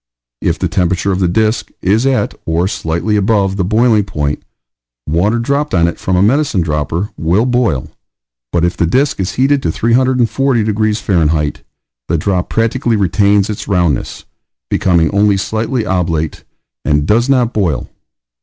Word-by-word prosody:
If - - 0
the - - -1
temperature 90 +2 0
of 95 - -1
the 90 - +2
disk 110 +5 0
is 110 +7 +1
at, 135 -1 0
or 85 +3 +1
slightly 95 +1 -2
above, 100 -1 +1
the 95 - -1
boiling 110 +2 +3
point, 75 -6 -3 0.7
water 90 +9 +1
dropped 140 +2 -1
on 85 -1 +3
it 85 - -4
from 95 - -1
a 90 - +3
medicine 130 -3 +2
dropper 80 +5 -2
will 90 +8 +1
boil; 120 - 0 0.6
but 85 -1 +1
if 85 - -1
the 85 - 0
disk 135 - +1
is 95 -1 -2
heated 135 +2 +2
to 80 - -1
340 125 +2 +1
degrees 110 0 -1
F., 80 -5 +1 0.5
the 85 - 0
drop 90 +2 -1
practically 115 +1 0
retains 100 +1 +2
its 105 - -5
roundness 90 - -1 0.5
becoming 85 -3 +2
only 100 0 +3
slightly 110 +4 -2
oblate 85 -5 -2 0.4
and 75 -1 +1
does 115 - +2
not 125 -3 +2
boil. 90 -11 -1
100 Hz, 155 wpm, -14 LUFS, 85-115 Hz, 0.7 s, boiling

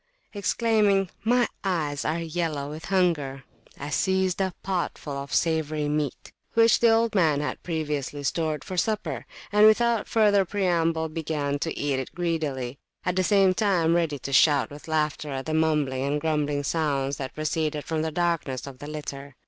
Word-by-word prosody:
Exclaiming, 205 -2 +2
My 240 +1 +3 0.2
eyes 155 -7 -1
are 155 +2 0
yellow 160 -4 -3
with 155 +2 -8
hunger! 165 -8 0 0.4
I 145 - -5
seized 190 +2 +1
a 190 -1 0
pot 185 -2 -2
full 145 -2 -6
of 140 0 -6
savoury 155 -2 0
meat 150 -2 -2 0.2
which 230 0 +5
the 235 - +5
old 225 0 +3
man 160 -7 +3
had 145 - -3
previously 150 -4 -3
stored 155 +1 -1
for 185 - -6
supper, 170 - -1 0.2
and, 210 +1 +7
without 230 0 +3
further 205 -3 +4
preamble, 170 -4 0
began 150 -3 -2
to 160 +2 -3
eat 140 -2 0
it 130 - -7
greedily, 150 -7 -2 0.3
at 180 -1 0
the 185 - +2
same 195 -1 +4
time 180 -5 +2
ready 165 -4 +1
to 140 +1 -6
shout 145 0 +4
with 145 +2 -11
laughter 155 -1 -1
at 135 -1 -4
the 155 - -3
mumbling 150 -5 +1
and 145 +2 0
grumbling 150 -2 0
sounds 140 -3 0
that 135 -1 -6
proceeded 155 -1 -1
from 160 -1 -1
the 160 - -1
darkness 165 -6 -1
of 135 -2 -10
the 145 - -8
litter. 140 -2 -7
160 Hz, 175 wpm, -26 LUFS, 145-185 Hz, 0.4 s, and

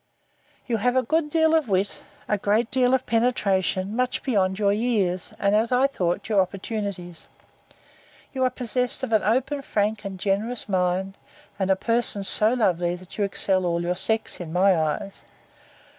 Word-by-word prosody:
You 235 -3 -1
have 245 +4 +1
a 260 - +3
good 315 +4 0
deal 320 +1 +3
of 315 -7 +2
wit, 195 +1 0 0.3
a 210 - +1
great 215 +4 +1
deal 255 0 +3
of 260 - -3
penetration, 205 -4 0
much 250 +1 -1
beyond 190 -7 +1
your 200 -1 +2
years, 205 -5 -1
and, 200 +1 +2
as 225 +3 +1
I 250 +2 +4
thought, 180 -11 -1
your 210 -3 +3
opportunities. 190 -3 -5 1.1
You 260 -2 -1
are 255 - +3
possessed 250 +1 -2
of 240 -3 -2
an 215 - +4
open, 260 +8 0
frank, 210 -4 -1
and 195 -2 -6
generous 210 +5 -1
mind; 185 0 -1 0.4
and 190 -1 0
a 190 - +4
person 230 -1 0
so 215 +3 +4
lovely, 175 -6 +1
that 185 +3 -12
you - - +2
excel 195 -1 0
all 170 -1 -1
your 175 +1 -1
sex, 220 +4 -1
in 170 -3 -7
my 185 +2 +4
eyes. 160 +4 -3
205 Hz, 175 wpm, -24 LUFS, 185-245 Hz, 1.1 s, I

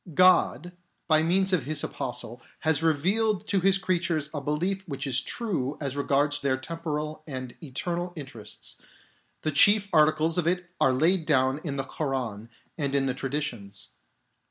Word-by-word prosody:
God, 180 -1 +4 0.3
by 155 -2 +5
means 190 +4 +2
of 160 -9 +2
His 150 0 0
Apostle, 120 -1 -5 0.2
has 160 -2 +2
revealed 185 +7 +1
to 195 - +3
His 195 +1 +4
creatures 170 -5 -1
a 145 - -3
belief 180 +7 -1
which 140 -3 -4
is 130 -1 +2
true 155 - -2
as 140 -2 -3
regards 145 +1 +1
their 135 -2 0
temporal 155 +1 -4
and 130 -4 -6
eternal 175 +5 -3
interests; 130 -8 -6 0.7
the 155 - 0
chief 205 +8 +6
articles 155 +2 +3
of 165 - 0
it 180 0 0
are 135 - +5
laid 160 +6 +2
down 130 -1 +3
in 145 -4 -3
the 135 - -1
Koran 125 -7 -4 0.3
and 140 -2 0
in 135 -1 +2
the 130 - 0
tradi 140 +3 -2
tions. 100 -8 -7
150 Hz, 160 wpm, -27 LUFS, 135-175 Hz, 0.7 s, chief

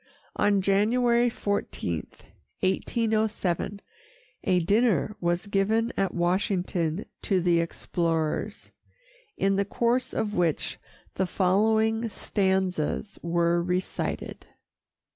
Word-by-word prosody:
On 205 -2 +2
January 235 +5 +3
14, 200 - -3 0.5
1807, 210 -1 0 0.6
a 185 -3 +3
dinner 210 - +2
was 175 +2 0
given 215 +4 +1
at 195 - 0
Washington 180 -1 0 0.2
to 195 -4 +1
the 175 -1 +3
explorers, 165 +3 -2 0.7
in 195 0 +2
the 200 - +3
course 240 +5 0
of 210 -1 -2
which 170 -5 0 0.3
the 190 - 0
following 220 +5 +2
stanzas 190 -2 -1
were 170 0 +1
recited. 180 +1 -3
195 Hz, 90 wpm, -27 LUFS, 175-215 Hz, 0.7 s, January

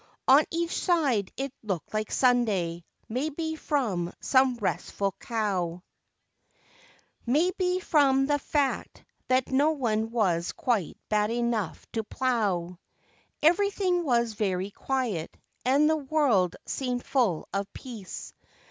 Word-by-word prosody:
On 275 +4 +7
each 335 +1 -1
side 280 - +1
it 270 0 -3
look¬ 205 -3 0
ed - - -24
like 215 0 -2
Sunday, 205 -10 +2 0.2
maybe 310 +6 -2
from 220 - -1
some 260 -1 +3
restful 200 -2 -1
cow; 185 -7 -2 1.4
Maybe 360 +6 +2
from 275 -6 +3
the 290 +1 +1
fact 285 -1 -1 0.2
that 255 0 +1
no 280 +4 +4
one 225 -6 0
was 185 -7 0
quite 220 -10 -1
bad 210 0 +2
enough 235 -3 -1
to 225 -2 -2
plow. 200 -8 -1 0.6
Everything 365 +1 +3
was 235 -5 +1
very 195 -2 -1
quiet, 235 -10 -2 0.3
and 280 +4 +4
the 315 0 +3
world 265 - +2
seemed 250 -2 -3
full 225 - +1
of 195 0 -2
peace. 225 -7 -8
245 Hz, 120 wpm, -27 LUFS, 205-285 Hz, 1.4 s, On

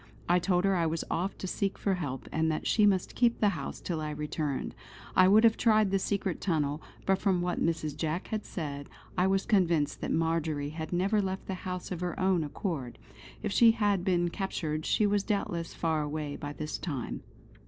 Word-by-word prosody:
I 175 +1 +4
told 180 +1 +1
her 195 -1 +3
I 170 -2 +2
was 160 +1 -1
off 185 +4 -1
to - - -6
seek 195 +1 -1
for 200 - 0
help, 145 -8 -4
and 160 0 +1
that 155 - -3
she 210 -2 +4
must 190 -3 +1
keep 240 -1 +3
the 210 - +4
house - - -5
till 165 -3 -3
I 155 - -3
returned. 150 -1 -3 0.4
I 185 - +7
would 210 +4 +6
have 225 -1 +5
tried 215 -3 +4
the 195 - +2
secret 190 -3 -1
tunnel, 150 -4 0 0.2
but 195 0 +2
from 195 -3 +2
what 175 0 -1
Mrs. 155 -3 -1
Jack 160 +3 -2
had 215 -1 -2
said 145 -4 -5 0.3
I 180 +1 +3
was 195 0 +1
convinced 170 -9 +2
that - - -2
Marjory 160 -3 0
had 160 +1 -6
never 195 +4 +2
left 190 0 -3
the 190 - -3 0.2
house 180 0 -5
of 180 -2 -4
her 175 -1 -3
own 185 -3 +2
accord. 145 - -4 0.5
If 210 - -1
she 230 +2 +6
had 205 -5 +1
been 175 -2 +2
captured 155 -5 -3
she 215 - +3
was 205 0 +2
doubtless 175 -5 -2
far 160 -2 0
away 150 -1 -3
by 145 0 -6
this 155 +1 -4
time. 140 -9 -4
175 Hz, 205 wpm, -30 LUFS, 155-195 Hz, 0.5 s, I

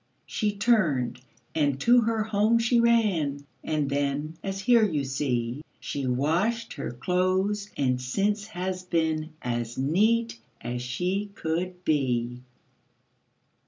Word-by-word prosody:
She 210 -2 -1
turned, 165 - +2 0.3
and 145 -3 +1
to 240 +1 +6
her 225 -1 +1
home 215 +1 +2
she 235 +1 +3
ran, 190 -12 +2 0.2
And 150 -2 0
then, 145 +2 -1
as 195 0 -3
here 235 +2 +5
you 155 -9 +1
see, 130 -2 -1 0.2
She 140 -2 -3
washed 170 - 0
her 140 - -4
clothes, 185 +8 0
and 125 -2 +1
since 200 +10 0
has 185 -2 -3
been 160 -3 -1
As 120 -1 -3
neat 215 - +2 0.2
as 120 +1 -4
she 180 +12 -2
could 180 +1 -3
be. 125 -5 0
165 Hz, 125 wpm, -27 LUFS, 135-210 Hz, 0.3 s, to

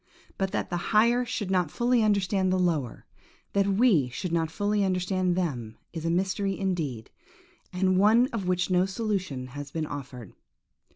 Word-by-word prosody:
But 195 0 -1
that 205 - -3
the 175 - 0 0.2
higher 240 +3 +4
should 220 -5 -3
not 180 -4 +2
fully 240 +6 +2
understand 200 -3 +1
the 185 - +2
lower; 160 -9 -1 0.5
that 200 0 +2
we 195 - +3
should 170 +8 -5
not 165 -1 0
fully 205 +4 0
understand 185 -1 0
them, 125 -12 -3 0.2
is 165 -1 -5
a - - +1
mystery 190 +2 0
indeed, 160 - -3 0.6
and 185 0 +2
one 220 +5 +5
of 200 -5 -3
which 180 0 0
no 180 +1 +3
solution 190 - -3
has 145 +2 -7
been 160 +2 -3
offered. 130 -7 -8
185 Hz, 165 wpm, -27 LUFS, 160-200 Hz, 0.6 s, one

